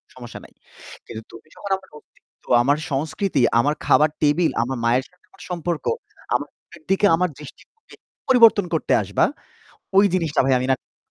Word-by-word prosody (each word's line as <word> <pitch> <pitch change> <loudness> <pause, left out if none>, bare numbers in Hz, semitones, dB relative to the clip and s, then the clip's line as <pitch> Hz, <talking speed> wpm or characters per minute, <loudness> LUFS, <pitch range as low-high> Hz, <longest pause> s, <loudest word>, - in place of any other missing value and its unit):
সমস্যা - - -10
নাই। - - -18 0.6
কিন্তু 110 - -8
তুমি 115 - -14
যখন 200 - -8
আমার 190 - -19
অস্তিত্ব, - - -25 0.2
আমার 145 +3 +2
সংস্কৃতি, 155 +2 -1 0.2
আমার 145 +5 +1
খাবার 155 0 +4
টেবিল, 155 +3 +2
আমার 130 +1 -4
মায়ের 125 +3 +2
সাথে 180 - -32
আমার 195 - -19
সম্পর্ক, 170 -2 -3 0.5
আমার - - -2 0.2
মায়ের - - -15
দিকে 195 +1 +2
আমার 180 +1 0
দৃষ্টিভঙ্গি 295 - -15 0.3
পরিবর্তন 230 -6 +5
করতে 160 - 0
আসবা - - +1 0.7
ওই 200 - +7
জিনিসটা 165 -4 0
ভাই 135 -1 +3
আমি 130 - -2
না 130 - -3
155 Hz, 160 wpm, -21 LUFS, 135-190 Hz, 0.7 s, ওই